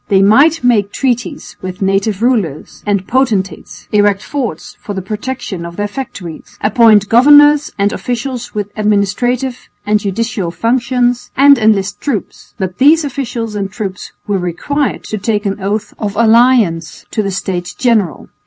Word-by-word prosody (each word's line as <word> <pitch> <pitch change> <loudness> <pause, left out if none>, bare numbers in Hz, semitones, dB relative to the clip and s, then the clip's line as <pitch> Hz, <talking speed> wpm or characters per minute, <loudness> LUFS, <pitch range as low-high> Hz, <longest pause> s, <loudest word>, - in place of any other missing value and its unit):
They 195 -2 +3
might 280 +10 +4
make 210 -5 +2
treaties 250 -3 -3
with 185 -1 -6
native 195 +2 0
rulers 205 - -1
and 200 -2 0
potentates, 230 -7 -1
erect 205 -1 +2
forts 245 - -5
for 205 - -7
the 190 - -3
protection 210 -2 -5
of 170 0 -8
their 205 +2 -2
factories, 200 -8 -8
appoint 215 -1 +4
governors 290 +5 +6
and 200 0 +1
officials 245 -1 -4
with 205 -1 -3
administrative 215 +5 -1 0.2
and 210 0 +2
judicial 210 -1 -2
functions, 245 +5 0
and 280 0 +6
enlist 205 -2 +1
troops, 260 -9 -5
but 185 -2 -4
these 305 +3 +5
officials 245 -5 -4
and 200 -2 -3
troops 195 -3 -6
were 205 -2 -1
required 260 - -2
to 215 - -5
take 210 +1 -1
an 195 0 -2
oath 205 +2 -2
of 205 -1 -3
allegiance 225 -7 +2
to 215 - 0
the 200 - -2
States 185 -2 -4
General. 225 -8 0
215 Hz, 150 wpm, -14 LUFS, 195-245 Hz, 0.2 s, governors